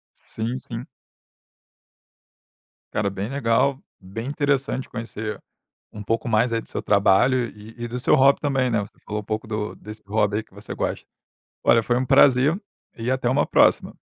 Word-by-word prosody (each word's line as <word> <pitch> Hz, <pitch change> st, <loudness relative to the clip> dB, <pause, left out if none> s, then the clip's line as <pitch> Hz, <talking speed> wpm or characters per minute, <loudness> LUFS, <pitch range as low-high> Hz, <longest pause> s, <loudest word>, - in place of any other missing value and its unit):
Sim, 115 Hz, +3 st, -4 dB
sim. 120 Hz, 0 st, -7 dB, 2.1 s
Cara, 100 Hz, -1 st, 0 dB
bem 100 Hz, +3 st, -4 dB
legal, 135 Hz, +1 st, +1 dB, 0.2 s
bem 115 Hz, +6 st, -6 dB
interessante 140 Hz, -2 st, -1 dB
conhecer 110 Hz, -2 st, -5 dB, 0.5 s
um 105 Hz, -1 st, -7 dB
pouco 115 Hz, +3 st, -1 dB
mais 115 Hz, +2 st, +2 dB
aí 115 Hz, -, 0 dB
do -, -, -17 dB
seu -, -, -4 dB
trabalho 105 Hz, +5 st, +3 dB
e 105 Hz, +2 st, -13 dB
e -, -, -2 dB
do 125 Hz, +2 st, -4 dB
seu 125 Hz, -, +4 dB
hobby 135 Hz, +1 st, +5 dB
também, 135 Hz, -3 st, +1 dB
né, 115 Hz, -, +2 dB
você 100 Hz, -, -9 dB
falou 105 Hz, 0 st, -3 dB
um -, -, -15 dB
pouco 110 Hz, +1 st, -3 dB
do 105 Hz, -1 st, -3 dB
desse 105 Hz, 0 st, -10 dB
hobby 105 Hz, 0 st, +1 dB
aí 110 Hz, -, -2 dB
que -, -, -29 dB
você -, -, -8 dB
gosta. -, -, -3 dB, 0.6 s
Olha, 115 Hz, -, +5 dB
foi 120 Hz, +2 st, 0 dB
um 130 Hz, 0 st, 0 dB
prazer 135 Hz, -, +5 dB, 0.4 s
e 115 Hz, +2 st, -2 dB
até 130 Hz, -2 st, 0 dB
uma 130 Hz, -, +2 dB
próxima. -, -, +3 dB
115 Hz, 175 wpm, -23 LUFS, 105-130 Hz, 2.1 s, hobby